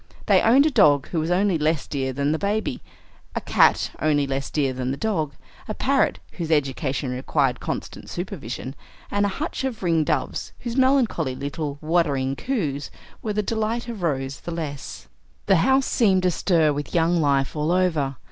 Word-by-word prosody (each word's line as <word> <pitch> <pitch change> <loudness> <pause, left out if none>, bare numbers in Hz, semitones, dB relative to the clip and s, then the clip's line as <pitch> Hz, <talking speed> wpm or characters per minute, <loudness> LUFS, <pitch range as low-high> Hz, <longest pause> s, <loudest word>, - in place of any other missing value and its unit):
They - - +5
owned 265 +6 +5
a 310 - +2
dog 145 - +4
who 170 - -1
was 160 +1 -1
only 180 -1 +2
less 155 -1 +1
dear 135 -2 -2
than 140 +2 0
the 160 - 0
baby, 205 -9 -1 0.5
a - - +1
cat - - +3
only 145 -2 +2
less 135 0 -3
dear 140 -4 0
than 130 0 -3
the 135 - -2
dog, 160 -9 -1 0.3
a - - -4
parrot - - +2
whose 165 -2 -5
education 140 -2 0
required 130 0 0
constant - - -5
supervision, 155 - -5 0.4
and 205 0 +2
a 195 - -4
hutch 310 -2 -3
of 255 -7 -3
ring 165 -3 +2
doves 150 -3 -2
whose 240 -1 -4
melancholy 260 - +2
little 145 +1 -4
"whuddering" 150 -5 +1
coos 150 - -2 0.3
were 215 - -2
the 210 +1 0
delight 225 +3 -2
of 230 -5 -6
Rose 135 -4 -2
the - - -8
less. 155 -5 -6 0.4
The 195 -2 +4
house 265 +9 +3
seemed 190 -5 +2
astir 170 -3 +2
with 145 +3 -5
young 170 0 +3
life 140 -2 +1
all 150 +2 0
over. 160 -7 +1
160 Hz, 175 wpm, -23 LUFS, 140-200 Hz, 0.5 s, They